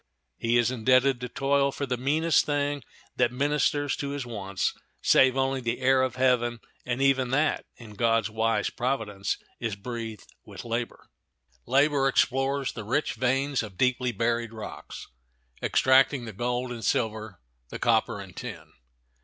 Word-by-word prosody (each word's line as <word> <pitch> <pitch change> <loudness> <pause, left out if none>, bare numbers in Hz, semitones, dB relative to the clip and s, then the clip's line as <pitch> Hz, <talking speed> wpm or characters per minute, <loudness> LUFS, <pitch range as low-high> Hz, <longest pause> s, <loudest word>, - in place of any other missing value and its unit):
He 115 +1 +2
is 120 0 +2
indebted 130 +2 +3
to 125 - -4
toil 140 +1 +1
for 140 - -3
the 125 -2 -1
meanest 155 +6 +2
thing 145 -1 -1 0.4
that - - +3
ministers 145 +1 +1
to 140 - -3
his 140 -2 -4
wants, 100 -5 -2 0.3
save 130 0 +5
only 135 0 0
the 120 0 -2
air 130 0 +4
of 130 -1 -1
heaven, 125 -2 +2 0.3
and 125 +2 0
even 135 -2 +3
that, 145 +3 +1
in 110 -3 -12
God's 115 0 +2
wise 110 -1 0
providence, 110 -6 -2 0.2
is 115 -3 -2
breathed 115 0 -6 0.2
with - - -10
labor. 115 +1 -4 0.6
Labor 140 +1 +3
explores 135 +1 +1
the 115 - -6
rich 130 +8 0
veins 135 +3 0
of 105 -5 -9
deeply 125 +1 +1
buried 115 +1 -1
rocks, 110 -1 -8 0.6
extracting 130 -1 +3
the 110 - -7
gold 125 +4 -2
and 115 -2 -6
silver, 110 -4 -1 0.3
the - - -6
copper - - +1
and - - -10
tin. - - -8
125 Hz, 155 wpm, -27 LUFS, 115-135 Hz, 0.6 s, save